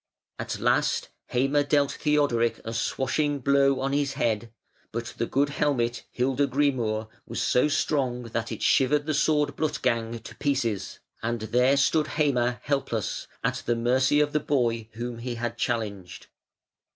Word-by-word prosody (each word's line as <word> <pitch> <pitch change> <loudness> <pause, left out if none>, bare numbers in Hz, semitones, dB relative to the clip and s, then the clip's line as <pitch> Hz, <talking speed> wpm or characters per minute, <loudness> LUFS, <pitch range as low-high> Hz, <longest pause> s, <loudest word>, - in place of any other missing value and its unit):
At - - -4
last - - +1 0.2
Heime 135 +4 +2
dealt 140 0 +2
Theodoric 140 -6 +1
a 115 - -4
swashing 145 +5 0
blow 140 0 +3
on 135 +1 -1
his 140 -1 0
head, 115 0 -1 0.4
but 115 +1 -4
the 115 - -1
good 140 +2 +1
helmet 125 -5 0
Hildegrimur 130 -4 +1 0.2
was - - -4
so 125 +4 +3
strong 140 -5 0
that 115 0 -4
it 110 - -5
shivered 145 +2 +3
the 155 - -1
sword 150 0 +2
Blutgang 120 -7 -1
to - - -9
pieces, 120 -9 -1 0.2
and 115 0 -2
there 125 +5 +3
stood 150 +2 +3
Heime 125 -5 +2
helpless, 135 -7 -2 0.2
at - - -1
the 120 - +2
mercy 130 +4 +2
of 145 -1 +1
the 150 - +3
boy 120 -6 0
whom 120 +1 -5
he 120 0 -4
had 120 0 -3
challenged. 105 -6 -3
130 Hz, 150 wpm, -26 LUFS, 115-145 Hz, 0.4 s, blow